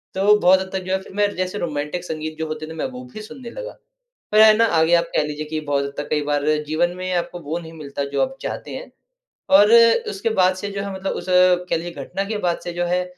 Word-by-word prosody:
तो 205 +2 +5
बहुत 185 0 +5
हद 190 - -6
तक 190 -1 -2
जो 190 +1 0
फिर - - -14
मैं 205 0 +2
जैसे 185 +2 -2
रोमांटिक 150 +1 -3
संगीत 155 -1 -5
जो 160 - -2
होते 155 0 -5
थे 160 - -8
मैं 160 - -3
वो 125 0 -8
भी 215 - -7
सुनने 240 +2 -10
लगा। - - -7 0.6
फिर 215 - +6
है 215 0 +8
ना 230 - +5
आगे 160 +2 +4
आप 170 - +2
कह - - +3
लीजिए 150 +1 -5
कि 155 -1 -2
बहुत 140 -1 +1
हद 140 - -6
तक 145 - -5
कई 150 -1 +1
बार 145 0 0 0.2
जीवन 165 +3 +1
में 185 0 -4
आपको 175 0 -3
वो 165 +1 -4
नहीं 165 -1 -11
मिलता 140 -2 -5
जो 140 - +1
आप 265 0 -4
चाहते - - -5
हैं - - -8 0.7
और 210 +2 +5 0.4
उसके 200 +3 -2
बाद 185 0 +4
से 205 +2 -5
जो 200 0 -4
है 200 -1 -5
मतलब 190 0 -3
उस - - -13
कह 180 -1 +4
लीजिए 170 +1 -5
घटना 195 +7 -3
के 215 - -1
बाद 170 - 0
से 175 - -4
जो 175 0 -1
है 180 +1 0
175 Hz, 260 wpm, -21 LUFS, 155-195 Hz, 0.7 s, है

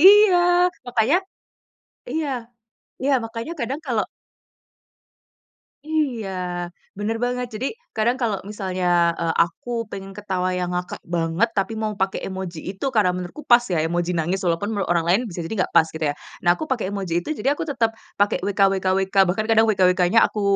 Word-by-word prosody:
iya. 400 +1 +8 0.5
Makanya 245 +6 +3 1.0
iya 315 -1 -1 0.8
iya, 275 +1 +2
makanya 230 +6 -5
kadang 270 +6 -2
kalau 230 -5 +1 1.8
Iya, 275 -10 -1 0.7
benar 215 +2 -1
banget. 250 0 -1
Jadi, 250 +6 -2 0.3
kadang 235 +4 +2
kalau 220 -4 +1
misalnya, 180 -4 +1
eee, 165 -1 +1
aku 170 +8 -9 0.2
pengen 195 -1 -7
ketawa 185 -3 -1
yang 180 0 -2
ngakak 180 0 -4
banget 170 +5 +1
tapi 195 +3 0
mau 215 -1 -1
pakai 190 0 0
emoji 185 -3 -5
itu, 195 +8 -5
karena 210 -7 +2
menurutku 180 +11 -6
pas 240 0 +7
ya, - - +2
emoji 175 +1 0
nangis, 175 +4 0
walaupun 175 +5 0
menurut 200 -4 -2
orang 170 -1 +2
lain 190 +7 +4
bisa 175 - -7
jadi 165 - -4
enggak - - -2
pas 160 - +6
gitu 160 - -7
ya. - - -1 0.3
Nah, 175 - +2
aku - - -3
pakai 235 -7 0
emoji 195 -4 -3
itu, - - -8
jadi 275 - +2
aku - - -4
tetap 230 -5 +1 0.2
pakai 205 +1 +3
"wkwkwk," 195 -1 +1
bahkan 215 +4 0
kadang 225 0 +5
"wkwk-nya" 185 +1 +4
aku 210 - -3
200 Hz, 165 wpm, -23 LUFS, 180-235 Hz, 1.8 s, iya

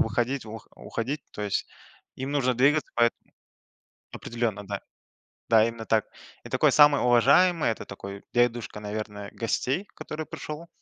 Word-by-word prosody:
выходить, 125 0 0
ух 110 +1 -9
уходить. 135 +5 -4
То 105 - -6
есть 100 - -1 0.5
им 130 +2 -4
нужно 130 -3 +2
двигаться. 145 +5 +3
Поэтому 120 0 +1 0.8
определенно, 115 -4 -3
да. 100 -1 -4 0.7
Да, 110 -1 +6
именно 115 -1 -6
так. 110 -2 +2 0.4
И - - -10
такой, - - +3
самый 145 -1 +6
уважаемый- 140 +7 +4
это - - -6
такой 100 0 -8
дедушка, 120 -3 +1
наверное, 105 -1 -5
гостей, 130 - -1
который 155 +1 -6
пришел, 155 +3 -7
120 Hz, 140 wpm, -27 LUFS, 110-140 Hz, 0.8 s, Да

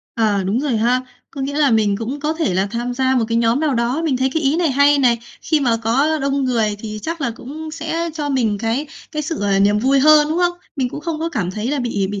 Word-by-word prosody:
Ờ, 210 -4 +1
đúng 210 +7 0
rồi 280 -6 0
ha. 240 +3 +2 0.3
Có 280 - -8
nghĩa 280 +2 -3
là 285 -4 +4
mình 210 -3 +2
cũng 250 +6 -5
có 305 +1 0
thể 315 - -1
là 190 +2 +1
tham 240 +1 -3
gia 260 0 +1
một 240 -3 +2
cái 230 - 0
nhóm 235 +4 +2
nào 300 -4 +1
đó, 240 +6 0
mình 290 -5 +1
thấy 260 +1 0
cái 320 - 0
ý 285 +3 +2
này 340 -4 +1
hay 285 +2 +4
này. 240 -3 +3 0.2
Khi 310 -2 +1
mà 240 -4 +2
có 270 +8 +1
đông 275 0 0
người 225 -5 0
thì 215 0 -6
chắc 330 0 -4
là 270 - 0
cũng 300 +7 -8
sẽ 330 +1 -3
cho 300 -2 -3
mình 230 -7 0
cái 235 +7 -1 0.3
cái 305 0 -2
sự, 320 +2 -4
ờ, 200 -1 +1
niềm 205 +1 +3
vui 270 +5 +3
hơn, 300 +1 +6
đúng 320 +2 -1
không? 350 0 +1 0.2
Mình 260 -3 0
cũng 290 - -7
không 320 0 -3
có 330 - -1
cảm 205 - -2
thấy 210 +4 -4
là 290 - -1
bị 205 -6 -1
bị 205 -1 -4
260 Hz, 275 wpm, -19 LUFS, 225-300 Hz, 0.3 s, hơn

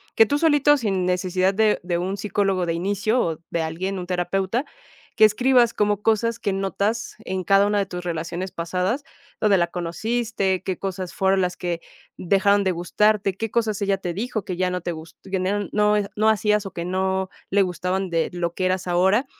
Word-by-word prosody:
que 225 - +7
tú 285 +6 0
solito, 290 -2 +4
sin 200 -9 -1
necesidad 185 +1 +1
de 215 +1 +2
de 175 -1 -1
un 190 +3 -2
psicólogo 195 -3 0
de 165 - -1
inicio 200 +7 0
o 165 -2 -2
de 165 - -1
alguien, 180 +5 -3
un 180 - -6
terapeuta, 190 - -1 0.5
que 215 - +7
escribas 240 +2 +4
como 210 -1 +1
cosas 225 +1 +1
que 200 - -1
notas 200 +4 -2
en 185 0 -4
cada 195 +2 +4
una 205 0 +1
de 200 - +1
tus 180 -1 -6
relaciones 170 +2 -3
pasadas, 180 - -2 0.4
¿dónde 205 -3 +4
la 175 - +2
conociste? 195 +3 -2
¿Qué 185 -3 -3
cosas 190 -2 -4
fueron 190 0 +2
las 180 -1 -1
que 175 -2 -3 0.4
dejaron 200 +2 +3
de 190 - +1
gustarte? 195 +3 +1
¿Qué 225 +1 -4
cosas 220 -3 0
ella 195 -1 +1
te 180 -2 -4
dijo 215 +2 -3
que 185 - -3
ya 185 +1 0
no 180 - -2
te 175 0 -3
gus 160 0 -11
que - - -13
ya 190 - 0 0.3
no 210 0 +3 0.2
no 215 +1 +3
hacías 210 -1 +2
o 195 - -6
que 170 0 -4
no 190 +1 -1 0.2
le 200 +1 +3
gustaban 180 +1 -1
de 165 -1 0
lo 170 -1 -2
que 185 - -2
eras 185 0 0
ahora?, 190 +8 +3
190 Hz, 200 wpm, -23 LUFS, 180-210 Hz, 0.5 s, que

